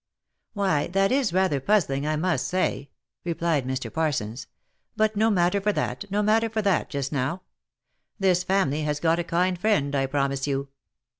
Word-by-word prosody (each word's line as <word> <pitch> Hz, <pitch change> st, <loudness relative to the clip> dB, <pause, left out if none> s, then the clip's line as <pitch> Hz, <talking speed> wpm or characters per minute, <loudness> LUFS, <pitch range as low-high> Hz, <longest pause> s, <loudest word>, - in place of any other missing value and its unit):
Why, 190 Hz, -8 st, +1 dB
that 195 Hz, +2 st, +1 dB
is 260 Hz, -6 st, +2 dB
rather 185 Hz, -5 st, +1 dB
puzzling, 145 Hz, -5 st, +1 dB
I 155 Hz, -, +1 dB
must 175 Hz, +3 st, 0 dB
say," 180 Hz, -6 st, -1 dB, 0.3 s
replied 165 Hz, -5 st, -1 dB
Mr. 130 Hz, 0 st, -4 dB
Parsons, 135 Hz, -8 st, -2 dB, 0.2 s
" -, -, -49 dB
but 215 Hz, 0 st, +2 dB
no 220 Hz, +2 st, +3 dB
matter 185 Hz, 0 st, +2 dB
for 210 Hz, +2 st, +2 dB
that, 205 Hz, -, -3 dB
no 205 Hz, +2 st, 0 dB
matter 225 Hz, +2 st, +2 dB
for 220 Hz, -1 st, -2 dB
that, 195 Hz, -4 st, +1 dB
just 140 Hz, -2 st, -3 dB
now. 145 Hz, +6 st, -2 dB, 0.7 s
This 185 Hz, -3 st, +2 dB
family 180 Hz, -6 st, +1 dB
have 150 Hz, -1 st, -1 dB
got 165 Hz, +2 st, +2 dB
a -, -, 0 dB
kind 175 Hz, +1 st, 0 dB
friend, 175 Hz, -9 st, +1 dB
I 135 Hz, -1 st, +1 dB
promise 140 Hz, 0 st, -1 dB
you." 140 Hz, 0 st, -2 dB
170 Hz, 175 wpm, -25 LUFS, 140-195 Hz, 0.7 s, no